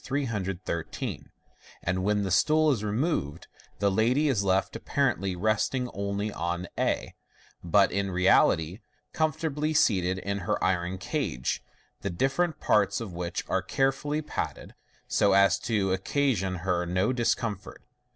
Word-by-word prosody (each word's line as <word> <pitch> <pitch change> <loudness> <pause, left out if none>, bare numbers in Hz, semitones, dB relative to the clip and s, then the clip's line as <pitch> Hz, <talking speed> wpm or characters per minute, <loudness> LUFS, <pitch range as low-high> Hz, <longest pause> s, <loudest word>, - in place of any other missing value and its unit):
313, 100 - -3 0.5
and 95 +1 -1
when 105 +1 +1
the 95 - -2
stool 155 - +4
is 115 -6 -1
removed, 105 - -1 0.3
the 100 -1 +2
lady 125 +9 +2
is 110 -7 +1
left 95 0 +1
apparently 95 +1 0
resting 110 +6 0
only 100 +1 -2
on 85 +2 -3
a, - - -1 0.5
but 95 +3 +4
in 100 +1 -1
reality 90 -1 +3 0.3
comfortably 155 -1 -1
seated 95 -7 +3
in 100 +1 -3
her 85 - -1
iron 90 0 0
cage, 65 -8 -2 0.4
the 100 - -2
different 135 - 0
parts 100 -1 +2
of 110 -6 -6
which 85 0 -4
are - - +1
all - - -23
carefully 135 +3 0
padded, - - -5 0.3
so 100 -1 +3
as 100 0 +5
to 105 -6 0
occasion 95 -2 0
her 90 -2 +1
no 90 +7 +1
discomfort. 115 -4 -2
100 Hz, 135 wpm, -28 LUFS, 95-130 Hz, 0.5 s, as